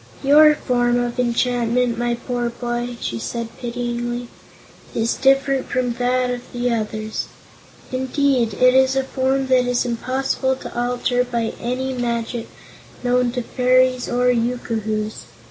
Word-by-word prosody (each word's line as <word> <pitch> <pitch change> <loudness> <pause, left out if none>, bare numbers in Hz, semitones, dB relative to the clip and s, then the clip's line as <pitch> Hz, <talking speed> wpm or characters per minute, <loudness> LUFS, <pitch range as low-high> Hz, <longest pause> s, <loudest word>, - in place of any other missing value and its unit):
"Your 300 +2 +7
form 245 -3 +1
of 245 +1 -2
enchantment, 245 0 +1
my 240 0 0
poor 240 0 -2
boy," 240 0 -4
she 115 - -3
said 230 - -4
pityingly, 240 0 -3 0.7
"is 230 0 +1
different 270 0 +2
from 250 -1 0
that 250 0 +1
of 245 -1 -3
the 245 0 0
others. 215 -1 -3 0.6
Indeed, 260 -3 +1
it 255 +3 +5
is 265 0 +4
a 270 - +2
form 265 0 0
that 250 -1 +4
is 245 0 +1
impossible 260 +2 -1
to - - -9
alter 245 +1 0
by 235 -2 -2
any 260 +2 -2
magic 235 -1 -2 0.6
known 250 0 +2
to 250 -1 -2
fairies 255 +1 +2
or 250 0 +3
yookoohoos. 220 -3 -2
245 Hz, 135 wpm, -21 LUFS, 235-255 Hz, 0.7 s, Your